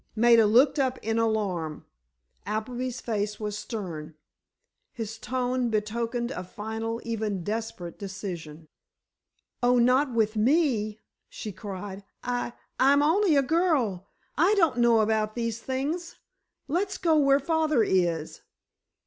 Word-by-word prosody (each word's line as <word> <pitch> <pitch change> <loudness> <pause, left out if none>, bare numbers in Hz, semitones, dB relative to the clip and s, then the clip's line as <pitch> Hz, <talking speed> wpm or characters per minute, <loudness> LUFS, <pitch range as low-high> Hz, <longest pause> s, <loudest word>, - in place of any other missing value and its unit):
Maida 230 -1 +6
looked 265 +7 +4
up 260 -1 +1
in 225 +1 0
alarm. 195 -9 -1 0.6
Appleby's 245 +4 -3
face 210 -2 -2
was 210 -1 -3
stern, 175 -9 -6 0.8
his 220 -1 -6
tone 250 0 -1
betokened 230 +3 -1
a 180 - -4
final, 220 +4 -4
even 215 -5 -2
desperate 205 -4 -4
decision. 175 -6 -7 0.9
"Oh, 245 0 +4
not 255 +3 +3
with 220 -2 +1
me," 220 -4 +2 0.3
she 215 - -6
cried; 195 0 -7 0.2
"I—I'm 255 +3 +1
only 335 +2 +3
a 280 - +4
girl—I 305 - 0
don't 330 -10 +3
know 235 -2 +5
about 215 0 0
these 230 -2 -2
things—let's 335 - -4
go 330 -3 +2
where 275 -1 +4
father 310 -4 +2
is." 175 -5 0
230 Hz, 115 wpm, -27 LUFS, 210-260 Hz, 0.9 s, Maida